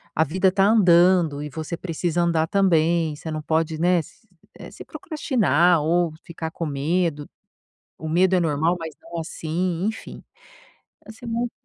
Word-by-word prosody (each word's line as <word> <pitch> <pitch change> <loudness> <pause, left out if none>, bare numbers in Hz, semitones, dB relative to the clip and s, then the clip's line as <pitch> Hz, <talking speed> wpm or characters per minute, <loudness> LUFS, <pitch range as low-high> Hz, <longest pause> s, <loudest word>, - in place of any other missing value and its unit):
a 160 - +3
vida 185 +5 +1
está 195 +1 +2
andando 175 -7 +4
e 150 - -6
você 160 +4 -5
precisa 175 0 -2
andar 165 -2 +1
também. 165 -4 +2
Você 160 +1 -7
não 155 - -4
pode, 160 0 -1
né, 180 0 +3
se 220 - -20 0.3
eh, - - -9
se - - -11
procrastinar 180 - +1
ou 170 +1 +1
ficar 160 -1 -6
com 165 - -5
medo. 150 +1 -1 0.7
O 160 - -7
medo 185 +3 +3
é - - +3
normal, 160 +2 +1
mas 160 -2 -6
não 170 - -9
assim", 170 +2 -3
enfim, 225 - -7 0.9
assim 220 +3 -11
muito 235 +1 -2
170 Hz, 160 wpm, -23 LUFS, 160-185 Hz, 0.9 s, andando